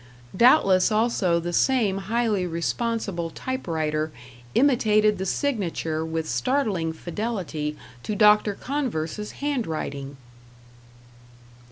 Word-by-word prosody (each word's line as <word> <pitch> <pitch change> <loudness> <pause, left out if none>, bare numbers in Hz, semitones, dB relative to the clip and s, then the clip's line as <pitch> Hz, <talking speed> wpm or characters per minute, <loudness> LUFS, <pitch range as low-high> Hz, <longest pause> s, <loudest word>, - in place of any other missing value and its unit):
Doubtless 195 -4 +5
also 215 -6 +2
the 175 +1 -4
same 215 -4 +2
highly 210 -2 0
responsible 175 +1 -2
typewriter 160 - -2 0.4
imitated 215 -6 +3
the 190 - -2
signature 175 - -1
with 160 0 -3
startling 170 - 0
fidelity 170 -4 -4 0.2
to 210 - -3
Dr. 210 -1 +5
Converse's 210 - -3
handwriting! 155 - -3
195 Hz, 85 wpm, -25 LUFS, 165-230 Hz, 0.4 s, Doubtless